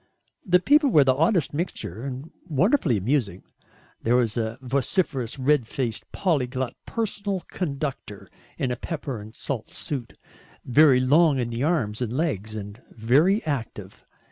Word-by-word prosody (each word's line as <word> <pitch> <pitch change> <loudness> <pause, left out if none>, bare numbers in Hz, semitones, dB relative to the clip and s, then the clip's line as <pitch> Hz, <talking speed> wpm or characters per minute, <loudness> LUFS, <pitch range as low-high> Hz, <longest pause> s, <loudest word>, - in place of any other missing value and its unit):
The 180 -1 +4
people 290 - +4
were 155 - +6
the 130 -1 +4
oddest 165 +3 +1
mixture, 145 - -4
and 135 +3 -6 0.2
wonderfully 160 - +2
amusing. 105 -3 -1 0.6
There 120 +2 +2
was 120 -4 +2
a 115 0 -2
vociferous 135 - -1
red 135 -2 +2
faced 120 -3 -3
polyglot 130 -7 -1
personal 205 -4 -2
conductor 140 - -4 0.3
in 130 - -1
a - - 0
pepper 140 -5 -5
and 110 +2 -12
salt 120 -5 -5
suit, 130 -6 -5 0.5
very 135 0 +5
long 145 +3 +4
in 120 -2 -2
the 115 +1 -3
arms 130 -9 0
and 120 +1 -2
legs 110 - -2
and 105 +2 -7
very 145 - +2
active. 115 -9 -5
130 Hz, 140 wpm, -25 LUFS, 115-160 Hz, 0.6 s, were